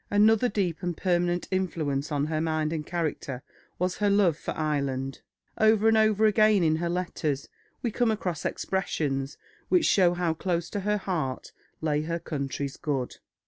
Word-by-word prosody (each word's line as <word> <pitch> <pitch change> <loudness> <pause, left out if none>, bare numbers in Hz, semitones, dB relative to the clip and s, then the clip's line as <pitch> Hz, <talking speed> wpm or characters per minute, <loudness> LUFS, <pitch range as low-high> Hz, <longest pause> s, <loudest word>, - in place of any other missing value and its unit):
Another 220 +4 +4
deep 185 -6 -1
and 175 -3 -3
permanent 175 -1 0
influence 155 -6 -1
on 145 -1 +1
her 155 0 -1
mind 155 -1 0
and 155 -2 -2
character 150 -6 -3 0.3
was 180 +1 -1
her 205 -1 +2
love 200 -5 +4
for - - -8
Ireland. 140 -3 -2 0.4
Over 220 0 +4
and 225 - +5
over 215 -1 +4
again 215 -2 +4
in 160 -1 +3
her 170 +1 -1
letters 165 -5 -2 0.4
we 235 - 0
come 240 +1 +1
across 180 -7 -2
expressions 145 -7 -2 0.3
which 360 -3 +4
show 175 -3 +4
how 175 -2 0
close 170 0 -2
to 205 - -2
her 210 +2 0
heart 160 -10 -3 0.3
lay 150 -2 +1
her 165 +2 -2
country's 140 -3 -4
good. 135 -5 -2
170 Hz, 165 wpm, -27 LUFS, 150-200 Hz, 0.4 s, and